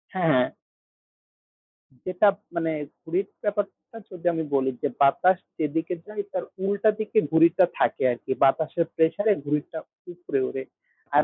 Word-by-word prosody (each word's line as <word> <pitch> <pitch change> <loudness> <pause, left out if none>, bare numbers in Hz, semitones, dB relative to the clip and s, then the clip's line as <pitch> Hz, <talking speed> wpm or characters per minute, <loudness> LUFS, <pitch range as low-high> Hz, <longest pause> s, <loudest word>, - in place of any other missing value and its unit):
হ্যাঁ। 155 -9 +3 1.6
যেটাপ 190 +2 +3 0.2
মানে 165 -1 0 0.3
ঘুড়ির 185 +4 -1 0.2
ব্যাপারটা 205 +2 -3
যদি 180 -2 -11
আমি 160 -1 -1
বলি, 135 -1 +2
যে - - +3
বাতাস 180 +7 +5 0.2
যেদিকে 160 +3 -1
যায় 210 -1 -4
তার 180 - -2 0.2
উল্টা 200 +2 +2
দিকে 215 0 -3
ঘুড়িটা 170 +3 +5
থাকে - - +1
আরকি। 120 +2 -6
বাতাসের 160 +4 +2
প্রেসারে 205 +7 +3
ঘুড়িটা 150 +2 -2 0.4
উপরে 170 -5 -3
ওড়ে। 135 - -4 0.5
আর 150 - +7
170 Hz, 130 wpm, -25 LUFS, 150-195 Hz, 1.6 s, আর